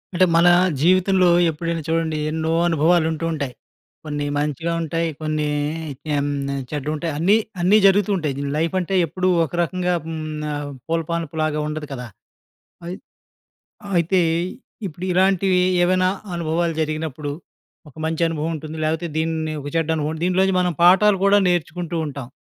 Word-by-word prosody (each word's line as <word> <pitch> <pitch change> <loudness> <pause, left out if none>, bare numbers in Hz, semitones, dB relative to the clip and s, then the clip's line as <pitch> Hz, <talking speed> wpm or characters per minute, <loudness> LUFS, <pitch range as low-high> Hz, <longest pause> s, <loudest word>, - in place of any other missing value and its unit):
అంటే, 185 - +5
మన 170 +1 +5 0.3
జీవితంలో 185 +3 +4 0.2
ఎప్పుడైనా 165 +1 -3
చూడండి 165 -1 0
ఎన్నో 160 0 -2 0.2
అనుభవాలు 165 +1 +3
ఉంటూ, 160 +1 -3
ఉంటాయి. 140 -5 -3 0.5
కొన్ని 145 -1 -3
మంచిగా 150 +3 -1
ఉంటాయి, 165 +1 -1
కొన్ని 155 -1 -1 0.7
ఎం 140 0 0 0.4
చెడ్డగా 150 0 -3
ఉంటాయి. 160 +2 -3
అన్నీ, 190 +7 +4 0.2
అన్నీ 190 +5 +5
జరుగుతూ 195 +1 +4
ఉంటాయి. 155 -5 -2
దిని 140 0 -3
లైఫ్ 165 +4 0
అంటే 185 +2 -2
ఎప్పుడూ 185 +4 -2 0.2
ఒక 150 - -12
రకంగా 180 +1 0
హ్మ్, 160 -1 -5 0.4
ఆహ్, 145 0 -4 0.2
పూలపనపులాగా 160 -2 -1
ఉండదు 150 0 -5
కదా! 125 -2 -6 0.8
అయ్ 180 +2 -5 1.0
అయితే, 175 +2 +2 0.7
ఇప్పుడు 175 +1 -7
ఇలాంటివి 190 0 +3 0.3
ఏవైనా 185 0 +2 0.3
అనుభవాలు 170 0 -1
జరిగినప్పుడు, 155 -2 -3 0.6
ఒక - - -22
మంచి 160 +1 -2
అనుభవం 160 0 -2
ఉంటుంది. 155 +1 -7
లేకపోతే, 160 +2 -1
దీన్ని 160 -1 -1
ఒక 140 - -7
చెడ్డ 165 -1 0
అనుభవం. 155 +1 -2
దీనిలోంచి 185 +1 +2
మనం 180 -1 0
పాఠాలు 195 +3 +6
కూడా 200 +1 +5
నేర్చుకుంటూ 175 0 -2
ఉంటాం. 140 -3 -7
165 Hz, 140 wpm, -21 LUFS, 155-180 Hz, 1.0 s, పాఠాలు